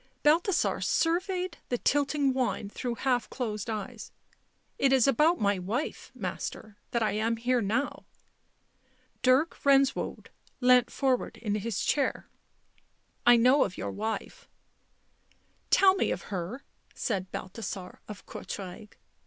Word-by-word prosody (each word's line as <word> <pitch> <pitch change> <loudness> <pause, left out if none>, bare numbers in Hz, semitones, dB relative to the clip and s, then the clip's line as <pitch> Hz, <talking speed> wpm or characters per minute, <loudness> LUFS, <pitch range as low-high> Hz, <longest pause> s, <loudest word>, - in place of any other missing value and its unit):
Balthasar 335 +5 +3
surveyed 360 +2 0
the 245 - 0
tilting 285 +1 +1
wine 250 -5 -1
through 240 +3 -4
half 250 -1 0
closed 215 -5 -4
eyes. 215 -3 -5 0.3
" - - -43 0.3
It 275 - +3
is 265 -3 +5
about 305 +7 +3
my 200 -2 +1
wife, 220 +11 -3
Master, 215 -2 -5
that 235 -1 0
I 215 - +1
am 225 +2 0
here 245 +1 +1
now." 230 +8 -2 1.1
Dirk 260 +6 +3
Benswoude 275 -1 +2 0.3
leant 250 -1 +5
forward 265 -3 0
in 210 -3 -2
his 215 0 -2
chair. 280 -3 0 0.5
" - - -21
I 240 - +9
know 255 +4 +5
of 185 - -4
your - - -3
wife." 220 +2 -5 0.6
" - - -38 0.3
Tell 380 -1 +6
me 385 - 0
of 180 - -2
her," 190 +10 -5 0.3
said 190 -5 -2
Balthasar 185 -1 -6
of 210 -2 -9
Courtrai. 200 +2 -7
245 Hz, 135 wpm, -29 LUFS, 210-275 Hz, 1.1 s, I